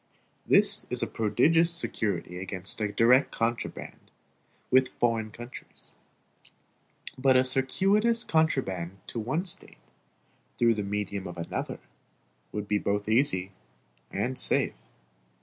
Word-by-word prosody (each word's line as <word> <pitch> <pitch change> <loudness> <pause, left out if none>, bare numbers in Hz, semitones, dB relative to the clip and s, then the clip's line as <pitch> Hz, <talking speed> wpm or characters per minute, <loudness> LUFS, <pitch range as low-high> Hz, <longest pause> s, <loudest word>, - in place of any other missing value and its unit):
This - - +4
is - - 0
a - - +1
prodigious 150 +11 +2
security 105 - -3
against 95 +2 -5
a 105 -1 -1
direct 125 +5 +3
contraband 115 +1 -4 0.6
with 130 0 +2
foreign 115 -2 0
countries; 120 +3 -12 1.3
but 130 0 +3
a 130 - +4
circuitous 195 - +1
contraband 100 - -1
to 115 - -6
one 135 - -2
State, 180 - +5 0.8
through 115 -1 +3
the 105 - -3
medium 100 -1 -4
of 90 0 -9
another, 85 - -5 0.7
would 105 -1 -5
be 105 0 0
both 100 0 -2
easy 110 -6 +2 0.6
and 120 +6 -2
safe. - - +3
115 Hz, 115 wpm, -27 LUFS, 100-135 Hz, 1.3 s, State